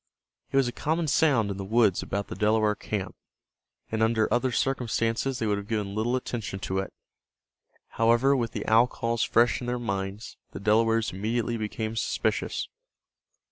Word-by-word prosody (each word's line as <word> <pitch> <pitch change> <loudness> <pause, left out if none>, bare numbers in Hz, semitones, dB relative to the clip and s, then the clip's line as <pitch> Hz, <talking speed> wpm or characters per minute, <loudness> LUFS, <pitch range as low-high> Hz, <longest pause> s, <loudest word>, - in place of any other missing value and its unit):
It - - +1
was 135 -2 +4
a - - -2
common 160 +6 -1
sound 130 -9 +3
in 95 - -5
the 100 - -4
woods 105 -2 +3
about 100 0 -3
the - - -6
Delaware 105 0 +2
camp, 105 -2 -4 0.8
and 110 0 -1
under 110 -1 +3
other 125 +1 +1
circumstances 125 0 0
they 115 - -2
would 105 -1 +1
have 100 - -9
given 105 -3 -2
little 110 +4 0
attention 120 -5 -4
to 95 0 -1
it. 95 - -4 1.0
However, 120 +5 +3
with 120 -4 -1
the - - -5
owl 115 +2 +5
calls 115 -1 -2
fresh 120 +2 +3
in 120 - -5
their 125 0 -1
minds, 100 -2 -4 0.2
the - - -6
Delawares 115 +2 +2
immediately 115 +4 -1
became 110 0 -3
suspicious. 115 - -1
115 Hz, 170 wpm, -27 LUFS, 105-120 Hz, 1.0 s, owl